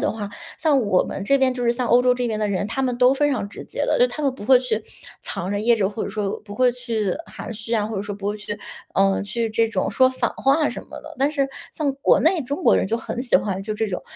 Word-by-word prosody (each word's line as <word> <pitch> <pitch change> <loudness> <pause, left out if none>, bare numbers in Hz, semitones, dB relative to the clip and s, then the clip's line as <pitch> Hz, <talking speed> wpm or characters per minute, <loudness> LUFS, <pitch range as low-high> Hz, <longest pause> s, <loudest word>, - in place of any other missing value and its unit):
的 - - +1
话， 210 -2 -5 0.3
像 300 -4 +3
我 200 -5 +3
们 - - -5
这 275 - +4
边， 265 -1 +2
就 250 -1 -4
是 235 - +4
像 245 +1 -2
欧 240 - +6
洲 250 0 +3
这 250 0 -1
边 220 -2 -2
的 210 -1 0
人， 200 0 -1
他 250 +5 -3
们 250 -2 0
都 250 +1 +5
非 290 +2 +2
常 235 -7 -1
直 - - -9
接 - - -3
的。 - - +1
就 - - +6
他 305 - -6
们 275 -3 +1
不 205 - -9
会 260 +2 +7
去 225 -4 -2 0.4
藏 180 - -5
着 205 0 -1
掖 235 +2 +4
着 195 -3 +1
或 215 +1 -4
者 - - -4
说 205 -2 -3
不 205 -1 -10
会 250 +2 +3
去 230 -5 -2
含 - - -8
蓄 225 +1 -4
啊， 215 -2 +1
或 215 -1 -4
者 195 - -2
说 205 0 -5
不 200 0 -6
会 210 - -2
去， 210 0 -6 0.4
呃， 195 0 +3
去 225 +3 -2
这 225 +1 +2
种 - - -1
说 260 - +5
反 260 - -1
话 285 +3 +2
什 - - -7
么 - - -9
的。 - - -11
但 275 +2 +2
是 280 -3 0 0.3
像 290 -3 0
国 275 - +3
内 330 +2 +3
中 285 +8 -4
国 - - +5
人 - - +1
就 225 - 0
很 235 +1 -5
喜 250 -1 +3
欢 195 -2 -2
就 215 +1 -3
这 220 +1 -1
种， 185 -3 -4
230 Hz, 315 characters per minute, -22 LUFS, 210-260 Hz, 0.4 s, 会